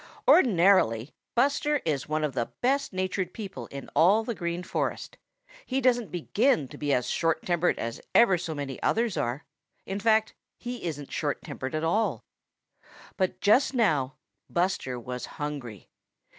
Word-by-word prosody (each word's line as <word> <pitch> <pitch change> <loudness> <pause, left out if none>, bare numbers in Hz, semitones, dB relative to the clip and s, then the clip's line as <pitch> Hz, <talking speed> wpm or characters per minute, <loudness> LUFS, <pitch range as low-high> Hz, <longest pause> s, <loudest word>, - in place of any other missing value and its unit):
Ordinarily 175 - +4 0.2
Buster 285 +4 +2
is 150 -3 -1
one 155 0 0
of 150 -3 -1
the 120 -2 -2
best 275 +3 +1
natured 185 0 -2
people 200 -4 -7
in 140 0 -8
all 200 +7 +5
the 235 - -3
Green 175 -2 -3
Forest. - - -3 0.5
He 265 - -1
doesn't 245 -4 +2
begin 195 - +1
to - - -10
be 145 -1 -1
as 125 -3 +1
short 165 -1 0
tempered 175 0 +1
as 115 0 -4
ever 230 -5 +6
so 165 -2 -4
many 140 -3 -5
others 230 -3 +1
are. 120 +5 -2 0.4
In 195 +1 -3
fact, 220 0 +3 0.2
he 245 -4 -6
isn't 145 -4 -5
short 145 -2 -2
tempered 130 +3 -5
at 155 - -1
all. 165 - 0 0.9
But 185 -1 -1
just 260 +6 +4
now 150 - +2 0.3
Buster 175 -8 -1
was 125 +1 -6
hungry. 140 -9 -5
175 Hz, 155 wpm, -27 LUFS, 145-220 Hz, 0.9 s, ever